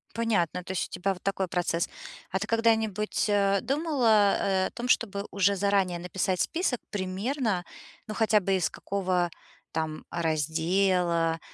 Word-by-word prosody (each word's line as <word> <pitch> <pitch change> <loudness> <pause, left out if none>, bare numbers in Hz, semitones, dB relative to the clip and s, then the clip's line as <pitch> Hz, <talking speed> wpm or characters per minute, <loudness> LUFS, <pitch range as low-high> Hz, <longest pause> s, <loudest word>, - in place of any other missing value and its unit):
Понятно, 190 -6 0
то 180 - -6
есть 185 - -2
у - - -47
тебя 195 +2 0
вот 180 - -14
такой 195 -1 -1
процесс. 175 -1 -1 0.4
А 190 - +1
ты 195 - -2
когда-нибудь, 220 -3 +1
э, 200 -1 +3
думала, 260 -9 +3
э, 190 -1 +1
о - - -9
том, 240 +1 -5
чтобы 200 -5 +1
уже 200 0 +2
заранее 195 -2 +1
написать 180 +1 -1
список 330 - 0
примерно, 200 +1 -1 0.4
ну, 215 - -4
хотя 220 -1 +3
бы 195 0 0
из 180 -3 +1
какого 185 -3 -1 0.4
там 160 -1 -3
раздела, 165 +1 +1
195 Hz, 150 wpm, -28 LUFS, 180-215 Hz, 0.4 s, э